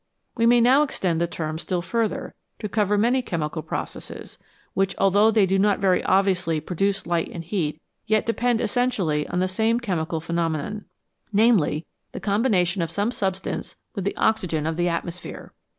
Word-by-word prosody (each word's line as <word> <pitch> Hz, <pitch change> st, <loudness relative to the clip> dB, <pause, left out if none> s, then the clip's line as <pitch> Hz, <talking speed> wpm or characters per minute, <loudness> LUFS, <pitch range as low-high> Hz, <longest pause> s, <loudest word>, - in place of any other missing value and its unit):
We 230 Hz, -1 st, +3 dB
may 240 Hz, 0 st, +6 dB
now 260 Hz, +5 st, +6 dB
extend 180 Hz, -, 0 dB
the 170 Hz, -, +2 dB
term 160 Hz, -2 st, -4 dB
still 175 Hz, 0 st, -2 dB
further 225 Hz, +4 st, -2 dB, 0.2 s
to 210 Hz, -, -4 dB
cover 210 Hz, 0 st, +1 dB
many 240 Hz, +5 st, +3 dB
chemical 160 Hz, -7 st, -3 dB
processes, -, -, -6 dB, 0.3 s
which, 195 Hz, 0 st, 0 dB
although 200 Hz, +3 st, +4 dB
they 215 Hz, -3 st, +4 dB
do 190 Hz, +1 st, +1 dB
not 205 Hz, 0 st, +3 dB
very 190 Hz, -2 st, +2 dB
obviously 185 Hz, -4 st, +2 dB
produce 195 Hz, +6 st, -1 dB
light 170 Hz, -1 st, 0 dB
and 170 Hz, -, -6 dB
heat, 160 Hz, -4 st, -2 dB, 0.3 s
yet 215 Hz, 0 st, +2 dB
depend 235 Hz, 0 st, +1 dB
essentially 205 Hz, -, 0 dB
on 180 Hz, -, -1 dB
the 185 Hz, -, +2 dB
same 220 Hz, +5 st, +1 dB
chemical 175 Hz, -8 st, -2 dB
phenomenon, 165 Hz, +4 st, -2 dB, 0.5 s
namely, 205 Hz, -8 st, +3 dB, 0.3 s
the -, -, -5 dB
combination 200 Hz, -4 st, +1 dB
of 165 Hz, -, -1 dB
some 205 Hz, +7 st, 0 dB
substance 190 Hz, -5 st, -3 dB, 0.2 s
with 195 Hz, -, -4 dB
the 200 Hz, -, -2 dB
oxygen 175 Hz, -8 st, +1 dB
of 160 Hz, 0 st, -1 dB
the 175 Hz, +1 st, +1 dB
atmosphere. 170 Hz, +1 st, -5 dB
190 Hz, 165 wpm, -24 LUFS, 170-220 Hz, 0.5 s, may